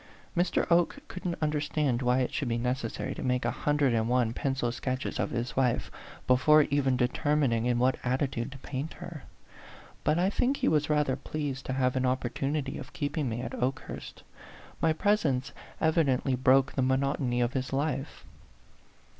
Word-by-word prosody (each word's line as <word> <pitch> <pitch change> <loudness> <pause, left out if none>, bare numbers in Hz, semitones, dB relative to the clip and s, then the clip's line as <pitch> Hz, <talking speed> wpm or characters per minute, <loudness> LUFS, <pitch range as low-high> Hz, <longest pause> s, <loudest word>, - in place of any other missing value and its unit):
Mr. 175 0 +1
Oke 170 +8 +3
couldn't 180 -2 -4
understand 150 -4 0
why 125 +1 +2
it 125 - -2
should 140 - -1
be 115 0 0
neces 125 0 -1
sary - - -4
to - - -7
make 125 0 0
a - - +1
hundred 145 -4 +1
and 110 0 +1
one 120 -2 +2
pencil 130 -2 -1
sketches 130 +2 -3
of - - 0
his 120 0 -3
wife 125 -3 +1 0.3
before 150 +5 +5
even 135 -3 +2
determining 125 -1 +1
in 120 -1 +2
what 130 +2 +2
attitude 130 0 -1
to 140 - -9
paint 135 +3 -5
her; 170 -5 -9 0.8
but 155 - +2
I 185 +3 +2
think 265 +6 +1
he - - 0
was 150 -1 +2
rather 150 -3 +2
pleased 140 -1 -4
to 130 - -1
have 130 -1 +1
an 130 - +1
opportu 130 +2 -1
nity 145 -3 -2
of 130 - -10
keeping 145 -2 -2
me 115 +1 -3
at 120 - -4
Okehnrst 130 +2 -4 0.6
my 160 - +4
presence 155 -8 +1 0.3
evidently 145 -5 +2
broke 130 +1 +4
the 135 - 0
monotony 130 -1 +1
of 120 0 +1
his 130 -1 -2
life. 135 0 -2
135 Hz, 175 wpm, -29 LUFS, 125-150 Hz, 0.8 s, before